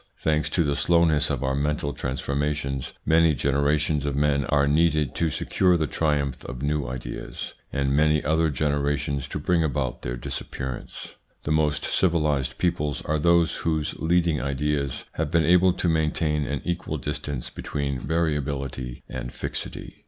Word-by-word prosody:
Thanks 75 -1 +1
to 85 +2 +2
the 70 -2 0
slowness 85 -3 +3
of - - -1
our 65 0 +1
mental 70 +1 -1
transformations 70 0 -2
many 80 -1 +4
generations 70 +2 +1
of 70 -1 -1
men 70 -1 +2
are 70 -1 +2
needed 75 -2 +2
to 85 - +1
secure 90 +4 +2
the 80 - +1
triumph 70 -4 -1
of 65 +1 -6
new 75 -2 0
ideas, 60 0 -6 0.2
and 70 -1 0
many 75 0 +3
other 80 +1 +3
generations 70 -1 0
to - - -4
bring 85 -2 +2
about 70 -4 -1
their - - -4
disappearance. 65 0 -6 0.3
The 75 - -2
most 75 -1 +2
civilised 75 -7 +1
peoples 75 -5 0
are 80 0 0
those 85 +1 +3
whose 80 -2 -1
leading 85 -1 +2
ideas 70 +1 -1
have 80 -2 -2
been 80 0 +3
able 90 +2 +5
to 90 - -1
maintain 75 -2 +1
an 70 0 -3
equal 85 -1 -2
distance 75 -3 -4
between 70 -2 -3
variability 70 -4 -2
and 60 - -5
fixity. - - -6
75 Hz, 150 wpm, -25 LUFS, 70-80 Hz, 0.3 s, able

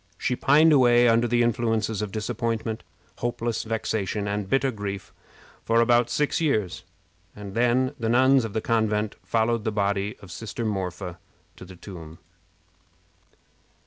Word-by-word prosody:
She 125 - -1
pined 155 +5 +5
away 120 -3 +5
under 115 +1 +3
the 120 0 +2
influences 115 -2 0
of 105 -2 -4
disappointment, 110 0 -3 0.4
hopeless 120 -1 -2
vexation, 110 -2 -2
and 100 -1 -3
bitter 135 +2 +2
grief 100 -3 -6 0.5
for 115 0 +2
about 120 0 +3
six 150 +6 0
years, 110 - 0 0.5
and 100 -2 -8
then 125 +3 +2
the 115 -1 -1
nuns 130 +2 +4
of 110 -3 -5
the 110 - -1
convent 110 -2 0
followed 115 0 0
the 110 - -1
body 100 0 -1
of 95 - -13
sister 115 +4 -5
Marpha 90 -3 -4 0.4
to - - -11
the 95 0 -12
tomb. 85 -4 -10
110 Hz, 145 wpm, -25 LUFS, 100-120 Hz, 0.5 s, pined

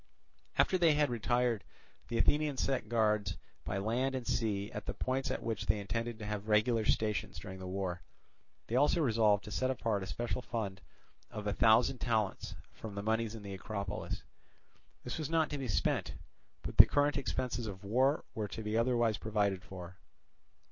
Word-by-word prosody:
After 185 - +4
they 165 -3 +5
had 145 -3 +2
retired 120 -1 +1 0.4
the 115 - -2
Athenians 145 +2 +2
set 125 -6 -1
guards 105 -5 +1 0.3
by - - -2
land 120 +7 0
and 130 -2 -3
sea 105 -4 -1
at 105 - -6
the - - -3
points 130 +1 -1
at - - -3
which 115 -3 -3
they 105 +2 +2
intended 115 +3 -3
to 110 - -7
have 105 0 -4
regular 110 +1 +3
stations 105 -1 0
during 95 -2 -8
the 95 - -6
war. 95 -1 -3 0.6
They 115 - -3
also 145 +6 +4
resolved 110 -7 +3
to 105 - -9
set 130 +4 0
apart 115 -5 0
a 95 - -5
special 120 +6 -2
fund 100 -6 -4 0.5
of 105 -1 -6
a 105 - 0
thousand 115 +3 +4
talents 110 -5 -1 0.2
from 110 -3 -8
the 100 - -4
moneys 110 +1 0
in 110 - -9
the 100 -1 -6
Acropolis. 100 0 -4 0.8
This - - -4
was 155 - -3
not 160 -1 +2
to 145 - -2
be 135 - -3
spent, 100 - 0 0.5
but - - -6
the - - +11
current 145 0 +2
expenses 125 -3 -2
of 95 -2 -7
the 100 - -10
war 130 +7 +2
were 110 -2 -2
to 110 +3 -6
be 105 +1 -2
otherwise 115 -2 +2
provided 105 -3 0
for. 90 +1 -9
110 Hz, 185 wpm, -33 LUFS, 100-125 Hz, 0.8 s, the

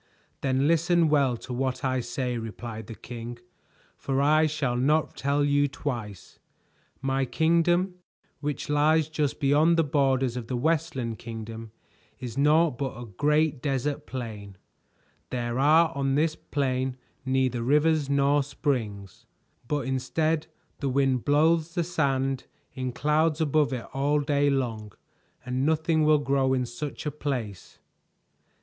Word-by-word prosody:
"Then 135 +1 +1
listen 170 0 +3
well 140 -5 +2
to 125 - -8
what 130 +2 -2
I 130 0 +1
say," 125 0 -3
replied 110 -1 -7
the 115 - -8
king, 120 +1 -8 0.6
"for 135 -1 -2
I 155 +2 +4
shall 145 -5 -1
not 150 +5 +1
tell 140 +1 +1
you 145 0 +3
twice. 115 -9 -6 0.6
My 135 0 +1
kingdom, 170 +7 +2 0.4
which 145 -1 -3
lies 150 +1 +3
just 150 -3 -1
beyond 150 +4 +4
the 165 - +4
borders 135 -4 +1
of 120 -2 -5
the 125 - -2
Westland 135 -5 -1
Kingdom, 115 -1 -7 0.5
is 125 -2 -6
naught 150 0 +3
but 135 -5 -3
a 120 - -6
great 150 +7 +1
desert 140 +1 -2
plain. 105 -6 -7 0.7
There 120 0 -2
are 160 +4 +5
on 135 -1 0
this 155 +2 +1
plain 130 -4 -2 0.3
neither 130 -2 0
rivers 150 +3 +2
nor 140 +1 +3
springs, 115 - -3 0.4
but 145 0 -1
instead 155 +5 0 0.3
the 140 - -1
wind 130 -2 +1
blows 160 +3 +2
the 175 - +1
sand 135 -6 -1 0.3
in 130 -1 -3
clouds 150 +4 +1
above 155 -2 +2
it 125 -3 -4
all 145 +2 +1
day 145 0 +2
long, 115 -7 -2 0.5
and 125 +1 -1
nothing 160 +1 +2
will 155 0 +5
grow 135 -2 +1
in 125 -1 0
such 140 +6 -6
a 150 - -1
place. 125 -10 -5
140 Hz, 140 wpm, -27 LUFS, 125-150 Hz, 0.7 s, are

